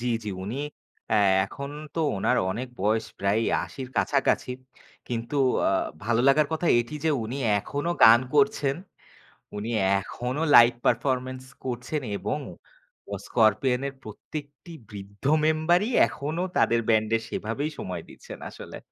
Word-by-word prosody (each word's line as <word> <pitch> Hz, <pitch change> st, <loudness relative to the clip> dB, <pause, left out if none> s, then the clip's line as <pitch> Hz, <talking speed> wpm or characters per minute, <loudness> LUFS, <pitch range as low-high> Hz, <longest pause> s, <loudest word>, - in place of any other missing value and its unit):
জি, 125 Hz, -, -4 dB, 0.2 s
জি, 105 Hz, -, -4 dB
উনি 110 Hz, +7 st, -4 dB, 0.5 s
অ্যা -, -, +2 dB, 0.3 s
এখন 140 Hz, +8 st, -7 dB, 0.2 s
তো 165 Hz, -, -1 dB, 0.2 s
ওনার 95 Hz, -, +1 dB
অনেক 125 Hz, +7 st, -4 dB
বয়স 110 Hz, +3 st, +1 dB
প্রায় 100 Hz, +3 st, +1 dB, 0.2 s
৮০ -, -, -11 dB
র -, -, -14 dB
কাছাকাছি। 135 Hz, -2 st, +1 dB, 0.6 s
কিন্তু 120 Hz, +3 st, -3 dB, 0.3 s
আ -, -, +2 dB, 0.3 s
ভালো 115 Hz, +1 st, +2 dB
লাগার 150 Hz, +2 st, +4 dB
কথা 160 Hz, +2 st, -1 dB
এটি 120 Hz, +6 st, -6 dB
যে 160 Hz, -, +3 dB
উনি 120 Hz, +5 st, -5 dB, 0.2 s
এখনো 145 Hz, +10 st, -3 dB
গান 115 Hz, +2 st, +8 dB
করছেন, 150 Hz, -8 st, +2 dB, 0.8 s
উনি 105 Hz, +2 st, -4 dB, 0.3 s
এখনো 125 Hz, +8 st, -4 dB
live 120 Hz, 0 st, +8 dB
performance 130 Hz, -1 st, 0 dB, 0.2 s
করছেন 125 Hz, +4 st, -3 dB, 0.2 s
এবং 100 Hz, +9 st, -2 dB, 0.7 s
অ -, -, 0 dB
'Scorpion' 120 Hz, +3 st, +2 dB
এর 140 Hz, -, -9 dB
প্রত্যেকটি 145 Hz, -, -9 dB, 0.2 s
বৃদ্ধ 100 Hz, +1 st, -11 dB, 0.2 s
মেম্বারই 160 Hz, +6 st, +2 dB, 0.2 s
এখনো 150 Hz, +4 st, -4 dB
তাদের 115 Hz, 0 st, +3 dB
ব্যান্ডে 110 Hz, 0 st, +3 dB
সেভাবেই 140 Hz, +8 st, -3 dB
সময় 90 Hz, -2 st, -5 dB
দিচ্ছেন -, -, -11 dB
আসলে। -, -, -10 dB
125 Hz, 135 wpm, -26 LUFS, 110-145 Hz, 0.8 s, গান